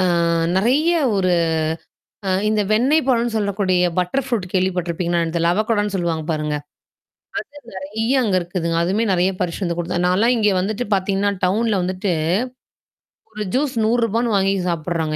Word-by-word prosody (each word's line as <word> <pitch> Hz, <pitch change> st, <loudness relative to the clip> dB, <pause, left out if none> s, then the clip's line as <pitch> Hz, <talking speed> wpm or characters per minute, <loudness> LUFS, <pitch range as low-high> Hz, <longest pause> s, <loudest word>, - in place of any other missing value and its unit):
அ -, -, +3 dB, 0.5 s
நெறைய 275 Hz, -, +3 dB, 0.2 s
ஒரு 185 Hz, -2 st, +2 dB, 0.9 s
அ -, -, +1 dB, 0.2 s
இந்த 215 Hz, 0 st, +1 dB
வெண்ணெய் 265 Hz, +8 st, +3 dB
பழம்ன்னு 235 Hz, -3 st, +1 dB
சொல்லக்கூடிய 200 Hz, -3 st, +1 dB, 0.2 s
பட்டர் 180 Hz, +9 st, 0 dB
ஃப்ரூட் 225 Hz, -8 st, -1 dB
கேள்விப்பட்டிருப்பீங்களாங்க 175 Hz, -2 st, 0 dB
என்னன்னு 165 Hz, +1 st, -3 dB
தெரில. 170 Hz, +1 st, +2 dB
அவக்கோடான்னு 210 Hz, -1 st, 0 dB
சொல்லுவாங்க 165 Hz, -3 st, -1 dB
பாருங்க. 150 Hz, -1 st, -2 dB, 1.1 s
அது 235 Hz, -, -12 dB
நெறைய 220 Hz, +7 st, 0 dB
அங்க 200 Hz, -5 st, +1 dB
இருக்குதுங்க. 170 Hz, -2 st, -2 dB
அதுவுமே 200 Hz, +6 st, +1 dB
நறைய 180 Hz, +2 st, +2 dB
பரிசுட்டு 180 Hz, +2 st, -2 dB
வந்து 170 Hz, -1 st, -2 dB
குடுத்து 175 Hz, +1 st, -1 dB
நான்லாம் 220 Hz, +7 st, +3 dB
இங்க 210 Hz, -2 st, +3 dB
வந்துட்டு 215 Hz, +5 st, -2 dB
பார்த்தீங்கன்னா, 195 Hz, +1 st, 0 dB
டவுன்ல 210 Hz, +2 st, +1 dB
வந்துட்டு 185 Hz, +2 st, -2 dB, 1.2 s
ஒரு 215 Hz, -1 st, -4 dB
ஜூஸ் 275 Hz, 0 st, 0 dB
100வானு 230 Hz, 0 st, +1 dB
வாங்கி 195 Hz, 0 st, +2 dB, 0.2 s
சாப்படுறாங்க 160 Hz, -1 st, -2 dB
195 Hz, 145 wpm, -20 LUFS, 175-225 Hz, 1.2 s, அ